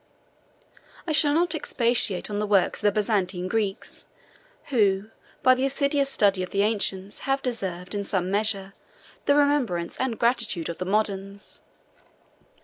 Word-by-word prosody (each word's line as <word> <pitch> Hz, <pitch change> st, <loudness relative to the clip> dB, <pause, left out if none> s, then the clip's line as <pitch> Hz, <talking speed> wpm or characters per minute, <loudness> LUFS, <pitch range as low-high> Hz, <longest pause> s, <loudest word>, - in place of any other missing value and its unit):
I 330 Hz, -, -2 dB
shall 295 Hz, -1 st, +4 dB
not 345 Hz, 0 st, +2 dB
expatiate 235 Hz, -, +1 dB
on 205 Hz, -, -2 dB
the 210 Hz, -, -1 dB
works 200 Hz, -3 st, +2 dB
of -, -, -12 dB
the 205 Hz, -1 st, +3 dB
Byzantine 195 Hz, -3 st, -1 dB
Greeks, 205 Hz, -1 st, -2 dB, 0.6 s
who, 210 Hz, -4 st, +1 dB, 0.3 s
by 255 Hz, -, +7 dB
the 255 Hz, +1 st, -1 dB
assiduous 280 Hz, 0 st, +1 dB
study 200 Hz, -7 st, +3 dB
of 185 Hz, -, -4 dB
the 200 Hz, 0 st, +1 dB
ancients, 200 Hz, -2 st, -1 dB
have 270 Hz, 0 st, +1 dB
deserved, 190 Hz, -7 st, -3 dB
in 205 Hz, -1 st, -2 dB
some 190 Hz, -2 st, 0 dB
measure, 200 Hz, -2 st, 0 dB, 0.5 s
the 285 Hz, -, +5 dB
remembrance 275 Hz, -13 st, +1 dB
and 255 Hz, -4 st, -2 dB
gratitude 225 Hz, -8 st, 0 dB
of 170 Hz, -, -6 dB
the 185 Hz, -, -3 dB
moderns. 200 Hz, 0 st, -1 dB
210 Hz, 145 wpm, -25 LUFS, 195-255 Hz, 0.6 s, by